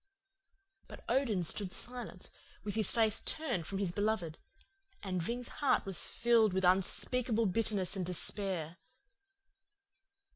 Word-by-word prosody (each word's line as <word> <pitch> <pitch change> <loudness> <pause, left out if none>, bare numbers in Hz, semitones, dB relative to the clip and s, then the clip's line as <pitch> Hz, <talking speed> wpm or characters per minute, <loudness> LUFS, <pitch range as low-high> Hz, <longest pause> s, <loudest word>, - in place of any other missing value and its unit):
"But - - -12
Odin 230 -9 +1
stood 185 +3 +1
silent, 240 -6 -3 0.3
with 205 -1 -4
his 220 -1 +4
face 220 -2 +2
turned 245 - -2
from 195 - -4
his 195 -3 0
beloved, 205 -5 -2 0.6
and 185 -2 -2
Ving's 240 +7 -3
heart 280 - +2
was 195 -4 0
filled 230 -4 +2
with 190 0 0
unspeakable 225 +5 +2
bitterness 205 -1 0
and 190 - -2
despair. 180 -1 -1
205 Hz, 120 wpm, -33 LUFS, 185-230 Hz, 0.6 s, his